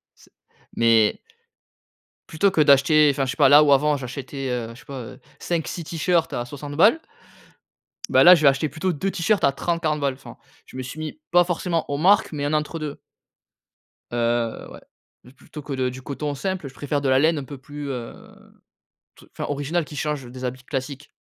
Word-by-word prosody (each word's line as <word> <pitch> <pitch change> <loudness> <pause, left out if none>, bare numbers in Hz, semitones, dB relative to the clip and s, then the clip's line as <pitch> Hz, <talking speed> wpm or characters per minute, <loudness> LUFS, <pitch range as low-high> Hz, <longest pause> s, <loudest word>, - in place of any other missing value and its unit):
c - - -22 0.5
mais 115 -2 +3 1.1
plutôt 165 +6 +2
que 165 - +2
d'acheter 150 +1 +5
enfin 135 0 -1
je 130 - -2
sais - - -8
pas, 140 -3 +5
là 145 +2 +8
où, 145 - +3
avant, 145 +2 +3
j'achetais 135 +1 -6 0.2
je 120 - -15
sais - - -18
pas, 140 -2 -7
heu, 115 - -11 0.2
5-6 170 0 -3
t-shirts 165 +1 0
à 120 - -2
60 145 +3 -8
balles. 210 - +5 1.1
Ben - - +5
là, 180 +1 +10
je 165 - -1
vais 145 - +7
acheter 140 +3 0
plutôt 185 +5 -2
2 190 +6 -2
t-shirts 195 +4 0
à 140 - +4
30-40 155 0 -1
balles 140 -2 0
enfin. 130 - -13 0.3
Je - - -16
me 130 - -4
suis 135 +5 -8
mis, 155 - -6
pas 175 0 +6
forcément 175 -1 -2
aux 140 - -1
marques, 190 +6 +3
mais 145 -1 -4
un 145 - -1
entre-deux. 150 -1 -3 1.1
Heu, 120 -1 -1
ouais. - - -12 0.5
Plutôt 150 - -11
que 145 - -6
de 130 -1 -1
du 130 +1 -9
coton 145 +2 -4
simple, 185 0 -4
je 135 - -12
préfère 145 0 -2
de 140 - 0
la 130 - +4
laine 155 +2 +2
un - - -6
peu 140 +1 -9
plus, 145 +2 -8
heu, 125 -3 -5 1.0
t - - -18
enfin, - - -4
originale 145 +4 -1
qui 150 - -11
change 150 -3 -3
des 130 +1 -7
habits 130 +1 -5
classiques. 140 +2 -5
145 Hz, 200 wpm, -23 LUFS, 135-160 Hz, 1.1 s, là